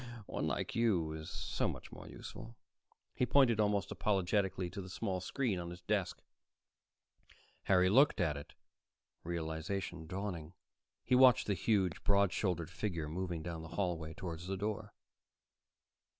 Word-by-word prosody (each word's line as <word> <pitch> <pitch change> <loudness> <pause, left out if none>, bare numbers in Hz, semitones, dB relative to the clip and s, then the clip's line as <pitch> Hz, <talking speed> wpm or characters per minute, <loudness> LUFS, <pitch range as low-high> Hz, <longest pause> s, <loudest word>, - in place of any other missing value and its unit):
But - - -12
one - - 0
like - - -2
you 95 -9 +2
is 80 0 -6
so - - -1
much - - -6
more - - -10
useful." 115 - -9 0.6
He 125 - +1
pointed 125 -4 +5
almost 105 -1 +2
apologetically 95 -2 +1
to 100 +1 -5
the 95 - -8
small 95 0 -2
screen 110 -1 -1
on 85 0 -5
his 90 +1 -9
desk. 95 0 -1 1.4
Harry 90 -1 +5
looked 135 +10 +5
at 80 -5 +2
it, 70 - -9 0.7
realization 85 +1 -3
dawning. 90 -3 -4 0.5
He - - +1
watched 125 -1 +7
the 100 - +1
huge, 95 -3 +1
broad 100 -2 +4
shouldered 90 -4 -1
figure 90 -6 -2
moving 85 0 -3
down 85 -1 -5
the 80 - -8
hallway 85 -5 -1
toward 85 -3 -5
the 95 +3 -4
door. 105 +1 -3
95 Hz, 150 wpm, -35 LUFS, 85-105 Hz, 1.4 s, watched